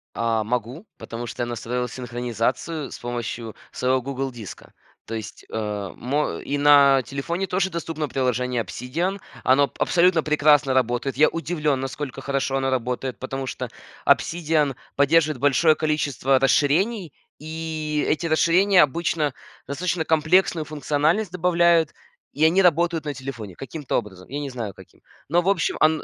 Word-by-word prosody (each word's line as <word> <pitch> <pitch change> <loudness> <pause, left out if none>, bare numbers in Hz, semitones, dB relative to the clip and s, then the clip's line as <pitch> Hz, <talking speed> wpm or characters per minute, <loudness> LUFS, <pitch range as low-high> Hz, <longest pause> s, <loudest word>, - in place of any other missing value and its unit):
А, 115 -1 0
могу, 125 - -3
потому 120 +1 -6
что 120 - -4
я - - -1
настроил 120 +1 -3
синхронизацию 125 +5 -3
с - - -8
помощью 120 -2 -5 0.2
своего 130 +1 +1
"Гугл 135 +1 -3
Диска". 115 -5 -10 0.3
То 115 - -7
есть, 110 -1 -8
а, 105 -3 -3
мо 145 +5 -1
и 145 - -2
на 140 -2 +6
телефоне 170 - -3
тоже 190 +1 0
доступно 165 -3 -4
приложение 125 -2 0
"Обсидиан", 165 - -3 0.2
оно 135 0 +4
абсолютно 175 -2 +3
прекрасно 150 -3 +4
работает, 130 +1 0
я 150 - +6
удивлен, 155 -3 -1
насколько 135 +1 -5
хорошо 135 -1 -1
оно 135 0 0
работает, 125 0 -2
потому 135 0 -4
что - - -5 0.4
"Обсидиан" 155 -4 +2 0.2
поддерживает 150 0 +3
большое 145 +4 +4
количество 145 -4 +1
расширений, 160 - +2 0.3
и 155 -1 -3
эти 155 +2 0
расширения 180 +4 +4
обычно 150 0 0 0.3
достаточно 165 +4 -1
комплексную 160 +1 +2
функциональность 155 +6 0
добавляют, 170 -2 +3 0.4
и 150 - -1
они 175 +4 +4
работают 170 -2 +2
на 145 - -2
телефоне 120 -8 -7
каким-то 145 - -3
образом, 95 -5 -6
я 140 +3 -4
не 145 -1 -4
знаю 115 -6 -5
каким. - - -17 0.3
Но, 175 +3 +3
в 180 - 0
общем, 190 -5 +1
он 155 0 +3
145 Hz, 145 wpm, -23 LUFS, 125-160 Hz, 0.4 s, на